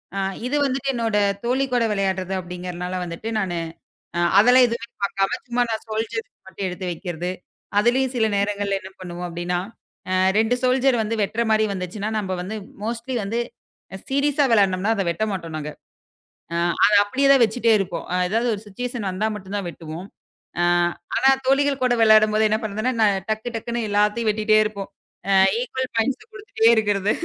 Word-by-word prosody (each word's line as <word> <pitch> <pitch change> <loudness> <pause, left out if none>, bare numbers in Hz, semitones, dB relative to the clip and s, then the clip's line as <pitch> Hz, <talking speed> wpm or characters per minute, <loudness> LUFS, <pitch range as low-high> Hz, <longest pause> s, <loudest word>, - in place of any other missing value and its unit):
அ - - -1 0.3
இது 275 - -1
வந்துட்டு 270 0 -1
என்னோட 225 -3 0 0.3
தோழி 260 +3 +1
கூட 245 -1 +3
விளையாட்றது 190 -2 -1
அப்படிங்கறதுனால 180 0 -5
வந்துட்டு, 170 +6 -6
நானு 180 -4 -2 0.6
அ - - +1 0.2
அதெல்லாம் 250 +3 +7
எதுவுமே 235 0 -4 0.2
பாக்காம 195 -1 0
சும்மா 245 0 +1
நான் 220 - -3
சோல்ஜர்ஸ் 225 +1 -3 0.2
மட்டும் 190 0 -4
எடுத்து 180 +1 -6
வைக்கிறது. 175 0 -4 0.5
அதுலயும் 250 +4 +2
சில 225 -2 +2
நேரங்கள்ல 200 0 0
என்ன 190 - -10
பண்ணுவோம் 180 -1 -6
அப்டின்னா, 175 +1 -2 0.8
அ 225 +2 +2
சோல்ஜர 260 +1 +3
வந்து 220 +1 -2
வெட்ற 220 +4 -2
மாரி 220 0 +3
வந்துச்சுன்னா, 195 +3 -4
நம்ப 190 -3 -4
வந்து 200 +4 -5 0.3
மோஸ்ட்லி 235 +3 -4
வந்து 220 +4 -2 0.7
சீரியஸா 285 +1 +2
வெளாடனமுன்னா 200 -1 +3
அத 200 - 0
வெட்டமாட்டோம் 175 -4 -3
நாங்க. 150 0 -5 0.8
அ - - -2 0.3
அத 210 - +3
அப்படியேதான் 275 +3 +4
வச்சிட்டே 225 +1 +2
இருப்போம். 180 -3 -3
அ - - +1
ஏதாவது 230 +4 +1
ஒரு 205 - -10
சிச்சுவேசன் 235 0 -4
வந்தா 195 +4 -1
மட்டும்தான் 200 -1 -5
வெட்டுவோம். 165 +2 -8 0.5
அ - - +3 0.5
ஆனா, 265 - +4 0.2
தோழிகள் 275 0 +2
கூட 250 -1 +3
விளையாடும்போது 215 0 +5
என்னாபண்றதுன்னா? 215 +3 -1
நான் 200 -3 +3
டக்கு 220 +2 -2
டக்குன்னு 235 0 -3
எல்லாத்தையும் 210 +2 +2
வெட்டிட்டே 215 0 +2
இருப்போம். 200 -2 -5 0.4
அ - - +4 0.3
ஈக்வல் 260 +1 -3
பாயிண்ட்ஸ்ல 255 +4 0
குடுத்துட்டே 410 - +1
இருக்குறது. 205 -2 +1
215 Hz, 155 wpm, -22 LUFS, 190-240 Hz, 0.8 s, அதெல்லாம்